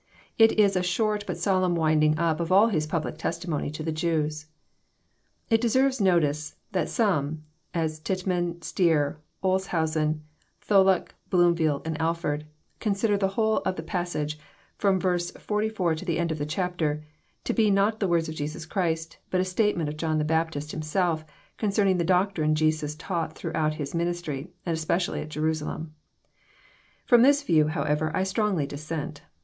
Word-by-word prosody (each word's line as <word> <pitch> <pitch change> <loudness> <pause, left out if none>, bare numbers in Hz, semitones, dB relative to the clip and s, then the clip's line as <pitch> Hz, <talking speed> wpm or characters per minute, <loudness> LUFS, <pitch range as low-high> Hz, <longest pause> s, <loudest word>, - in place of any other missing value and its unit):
It 225 0 +7
is 205 -2 +4
a 180 - +2
short 210 +3 0
but - - -3
solemn 185 -3 +2
winding 155 -1 +3
up 165 -1 +1
of 170 0 -2
all 205 +5 +6
His 155 -7 0
public 155 0 -3
testimony 170 -3 -2
to 155 +1 -6
the 160 - -1
Jews. 155 -1 -1 1.0
It 225 0 +4
deserves 260 +1 +2
notice, 155 -5 +2 0.2
that 185 - 0
some, 160 - 0 0.3
as 160 -2 -1
Tittman, 175 -1 -2
Stier, 155 -3 +1 0.2
Olshausen, 160 -5 0 0.5
Tholuck, 190 -3 +4 0.2
Bloomfield, 170 -5 +2
and 160 0 -3
Alford, 160 -2 -1 0.3
consider 205 0 +1
the 200 -1 +1
whole 220 +3 +1
of 185 - -1
the 160 - -5
pas 175 +1 -2
sage, 150 0 -3 0.4
from 195 -2 +2
verse 175 -2 0
forty 210 +1 -1
four 185 -7 0
to 160 - -5
the 170 -4 -1
end 170 -1 0
of 155 - -3
the 145 - -2
chapter, 155 -3 -1 0.4
to - - -1
be 220 -2 +3
not 200 +2 +2
the 195 - +1
words 170 -2 +1
of 160 - -4
Jesus 155 +2 -5
Christ, 165 -2 -2
but 185 - +1
a 185 - +2
statement 185 -3 +1
of 150 +1 -5
John 155 0 0
the 150 - +1
Baptist 160 -2 -1
himself, 160 +1 0 0.4
concerning 200 -3 +2
the - - +2
doctrine 180 -3 +2
Jesus 155 -1 0
taught 165 -1 -3
throughout 155 -2 -1
His 145 -2 -5
ministry, 170 -3 -2 0.2
and 165 -2 -1
specially 170 +3 0
at 155 - -7
Jerusalem. 155 0 -2 1.1
From 240 -2 +6
this 285 +3 +5
view, 155 - +3
however, 155 0 0
I 185 - +2
strongly 190 -5 0
dissent. 150 +1 -5
170 Hz, 165 wpm, -26 LUFS, 155-190 Hz, 1.1 s, It